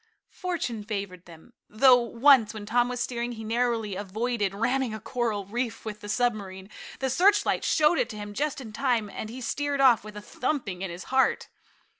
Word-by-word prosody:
Fortune 320 - -3
favored 195 -4 -5
them, 165 -2 -15 0.2
though 250 +3 +6
once, 235 -2 +4
when 210 -1 -7
Tom 245 +3 +2
was 250 0 -4
steering, 240 0 -2
he 220 -1 -8
narrowly 225 -2 -1
avoided 205 +2 -2
ramming 245 +2 0
a - - -6
coral 220 -3 -2
reef 230 +3 -4
with 210 -1 -6
the 205 - -8
submarine. 205 -5 -2 0.3
The 265 - -1
searchlight 395 +9 +3
showed 310 +2 +3
it - - 0
to 215 - -7
him 205 0 -7
just 290 +5 -2
in 225 -5 -9
time, 235 -5 0
and 215 - -6
he 250 +3 -8
sheered 285 +3 -2
off 255 -6 +5
with 210 0 -10
a - - -4
thumping 215 -5 -3
in 195 - -3
his 175 +1 -7
heart. 265 0 +2
230 Hz, 190 wpm, -27 LUFS, 205-255 Hz, 0.3 s, though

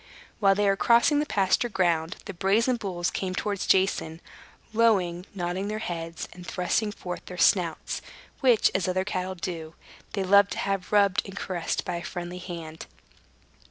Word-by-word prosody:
While 195 -3 +5
they 205 +1 +1
were 195 0 +4
crossing 235 +8 +4
the 300 - -1
pasture 200 +3 +2
ground, 175 -3 +1
the 200 - -6
brazen 215 +8 +2
bulls 180 -5 -2
came 185 -1 -3
towards 200 0 -2
Jason, 185 -4 +2 0.5
lowing, 195 -6 +2
nodding 180 +2 -2
their 215 +1 -3
heads, 165 -5 -5
and 180 - -11
thrusting 180 +4 -1
forth 180 -3 -6
their 180 - -7
snouts, 175 -2 +2 0.4
which, 245 -5 +4
as 185 -2 0
other 185 +1 0
cattle 185 -1 -3
do, 165 -3 -6 0.4
they 195 - -1
loved 200 +1 +5
to - - -7
have 195 -2 -2
rubbed 200 -2 +4
and 195 0 -9
caressed 175 -4 -2
by 175 -1 -2
a 170 - -6
friendly 175 0 -6
hand. 165 -3 -8
185 Hz, 165 wpm, -27 LUFS, 175-205 Hz, 0.5 s, While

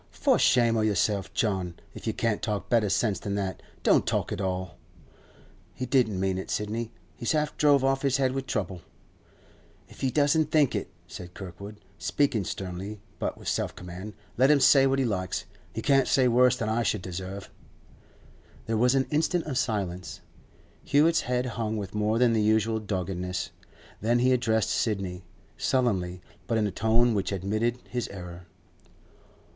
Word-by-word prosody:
'For - - +2
shame 115 -2 +4
o' - - +2
yourself, 100 -1 +1
John. 95 -7 -1 0.2
If - - -9
you - - +1
can't 115 -2 -1
talk 105 -2 -3
better 115 -4 +3
sense 100 +1 +1
than 100 -1 -3
that, 95 -2 -3 0.2
don't - - +4
talk - - 0
at 95 - -3
all. 95 -4 -3 1.0
He 130 - -3
don't 120 -7 +2
mean 95 0 0
it, - - -7
Sidney. 110 +2 -2 0.2
He's 120 - -1
half 150 -1 0
drove 145 -3 +4
off 135 0 +2
his 135 -2 +2
head 130 -2 +2
with 135 0 -4
trouble.' 95 -7 -3 1.1
'If - - -15
he 130 - +2
does 145 +1 +3
think 155 -3 +3
it,' 100 - -3 0.2
said 90 0 -10
Kirkwood, 100 +2 -8 0.2
speaking 105 - +1
sternly 95 +2 -5 0.2
but - - -2
with - - -11
self - - -1
command, 90 +4 -8 0.3
'let 130 +2 +6
him 150 -1 +5
say 135 0 +6
what 135 0 +1
he 135 - +1
likes. 95 -5 -2 0.3
He - - -5
can't 135 -3 +4
say 130 -2 +4
worse 125 +1 +5
than 115 -3 -2
I 110 +2 +1
should 95 -4 -1
deserve.' 95 +2 -6 1.1
There 110 0 -1
was 125 +4 +3
an 135 -1 +2
instant 160 +3 +1
of 145 -4 -4
silence. 95 - -3 0.6
Hewett's 155 +3 +3
head 125 0 -1
hung 115 -3 -2
with 100 -3 -5
more 105 +1 +1
than 120 -1 +4
the 110 - +2
usual 110 +1 +2
doggedness. 90 -3 -3 0.5
Then 115 +3 +2
he 125 +1 +3
addressed 110 -4 +2
Sidney, 95 -5 -2 0.3
sullenly, 95 -8 0 0.2
but 115 0 +1
in 110 - +2
a 105 - -1
tone 115 +4 +2
which 100 -2 -1
admitted 110 +5 -1
his 120 -2 -3
error. 90 -2 -9
110 Hz, 175 wpm, -27 LUFS, 95-125 Hz, 1.1 s, let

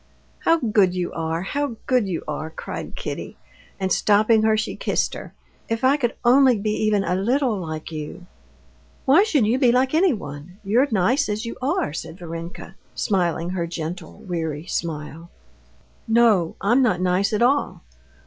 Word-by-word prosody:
"How 330 - +3
good 210 - +2
you 180 -1 -2
are! 165 +1 -2
how 280 +4 -2
good 250 -5 +2
you 175 -4 -3
are!" 155 +1 -4
cried 160 - -7
Kitty, - - -6 0.4
and 190 -1 -1
stopping 215 +3 +4
her, 220 0 +3
she 215 - -2
kissed - - -1
her. - - -8 0.4
"If 225 +2 -2
I 265 +2 +5
could 245 -5 -1
only 255 0 +6
be 210 +1 -1
even 210 -2 +2
a 180 - -1
little 240 +6 +1
like 155 -2 -6
you!" 155 +3 -7 0.8
"Why 280 +8 +6
should 310 - +2
you 235 +5 +1
be 250 -3 +5
like 260 +3 +2
anyone? 185 - -1
You're 235 +8 +3
nice 220 +5 +2
as 210 +3 -2
you 230 - -5
are," 280 - 0
said 165 +1 -6
Varenka, 170 0 -8 0.2
smiling 175 -4 0
her 175 -2 -2
gentle, 165 +1 -6
weary 160 -3 -3
smile. 165 -1 -5 0.8
"No, 225 -7 +3
I'm 240 +7 +3
not 220 -9 +2
nice 185 +2 +1
at 215 +2 +1
all. 275 +4 +1
205 Hz, 165 wpm, -23 LUFS, 170-245 Hz, 0.8 s, only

